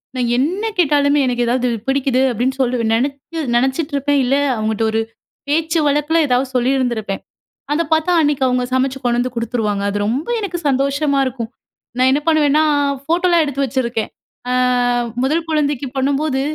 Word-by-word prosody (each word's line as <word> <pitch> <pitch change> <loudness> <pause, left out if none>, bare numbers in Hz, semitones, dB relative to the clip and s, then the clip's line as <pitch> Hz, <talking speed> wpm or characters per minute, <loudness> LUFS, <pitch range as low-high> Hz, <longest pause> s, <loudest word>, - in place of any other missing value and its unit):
நான் 245 -2 0
என்ன 345 - 0
கேட்டாலுமே 290 -3 +3
எனக்கு 245 -1 0
ஏதாவது 250 +1 +1 0.2
பிடிக்குது 270 -1 +1
அப்பிடின்னு 255 +4 -1
சொல்லி 250 0 +1 0.2
நினச்சி 280 +6 -2
நினச்சிட்ருப்பேன். 280 +2 0
இல்ல 260 +2 +2 0.2
அவுங்ககிட்ட 220 0 -1
ஒரு 220 - 0 0.5
பேச்சு 320 +2 +1
வழக்குல 295 +3 +1
ஏதாவது 255 +1 +1
சொல்லியிருந்திருப்பேன். 245 -5 0 0.5
அத 335 +3 +1
பார்த்தா 315 +3 +1
அன்னக்கி 290 -3 +1
அவுங்க 250 0 +1
சமைச்சு 265 +1 0
கொண்டு 240 -1 +1
வந்து 250 0 -2
கொடுத்துருவாங்க. 220 -3 -1
அது 205 - -2
ரொம்ப 265 +8 -2
எனக்கு 390 -5 -3
சந்தோஷமா 280 +1 +1
இருக்கும். 240 -3 -4 0.5
நான் 255 +1 +4
என்ன 290 +2 +1
பண்ணுவேன்னா, 305 -1 +3 0.4
ஃபோட்டோல்லாம் 340 +2 +2
எடுத்து 275 -1 -1
வச்சிருக்கேன். 235 -3 -2 0.4
அ - - +1 0.7
முதல் 320 +4 0
குழந்தைக்கு 290 -3 0
பண்ணும்போது, 275 +1 0
270 Hz, 145 wpm, -18 LUFS, 250-295 Hz, 0.7 s, நான்